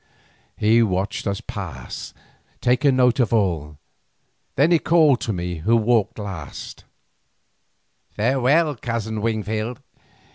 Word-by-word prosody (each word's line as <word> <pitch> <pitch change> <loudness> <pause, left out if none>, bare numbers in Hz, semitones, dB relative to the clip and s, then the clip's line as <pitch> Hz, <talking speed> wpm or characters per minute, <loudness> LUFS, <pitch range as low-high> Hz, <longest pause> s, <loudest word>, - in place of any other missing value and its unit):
He 110 +2 +4
watched 100 -1 -1
us 100 -1 -2
pass, 80 - -7 0.4
taking 130 +2 +2
note 125 0 +3
of 120 -5 +2
all, 85 -9 0 0.8
then 150 +6 +3
he 170 - +5
called 155 -6 +4
to 110 - -2
me 90 -2 -3
who 110 +9 +2
walked 115 -1 +1
last: 95 -9 -8 1.3
"Farewell, 135 +6 +2
Cousin 110 -2 -3
Wingfield. 110 +1 -2
110 Hz, 110 wpm, -22 LUFS, 100-125 Hz, 1.3 s, he